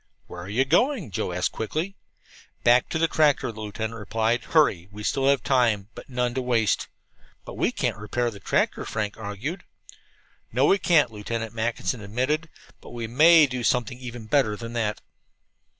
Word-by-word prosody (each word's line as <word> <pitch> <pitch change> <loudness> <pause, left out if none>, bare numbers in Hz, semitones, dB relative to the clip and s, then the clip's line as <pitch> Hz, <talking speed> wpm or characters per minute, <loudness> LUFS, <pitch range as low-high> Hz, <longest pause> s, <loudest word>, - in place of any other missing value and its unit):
"Where 90 - -9
are 90 - -8
you 125 +6 +2
going?" 240 - +1
Joe 90 - -2
asked 90 0 -1
quickly. 160 - -3 0.7
"Back 120 +1 +4
to - - -1
the 165 +1 +2
tractor," 145 -5 +2
the 110 0 -10
lieutenant 110 +2 -5
replied. 110 +3 -1
"Hurry! 100 - +2
We 105 +1 -9
still 135 +4 0
have 140 -3 +3
time, 115 -6 +2
but - - -11
none 125 -1 -1
to 130 - -1
waste." 120 -4 +1 0.6
"But - - -8
we - - 0
can't - - -2
repair 120 +3 -2
the 100 - -11
tractor," - - 0
Frank 105 -2 -3
argued. 110 - -5 0.9
"No, 130 +5 +2
we 195 +6 +4
can't," 165 -9 +3
Lieutenant 115 +1 -4
Mackinson 115 -1 -2
admitted, 130 +10 -1 0.3
"but - - -12
we 120 -1 -5
may 155 +7 +6
do 125 -3 -4
something 125 +1 0
even 120 -3 -8
better 110 -2 +2
than 115 +2 -7
that." 110 -3 -2
120 Hz, 175 wpm, -25 LUFS, 110-135 Hz, 0.9 s, may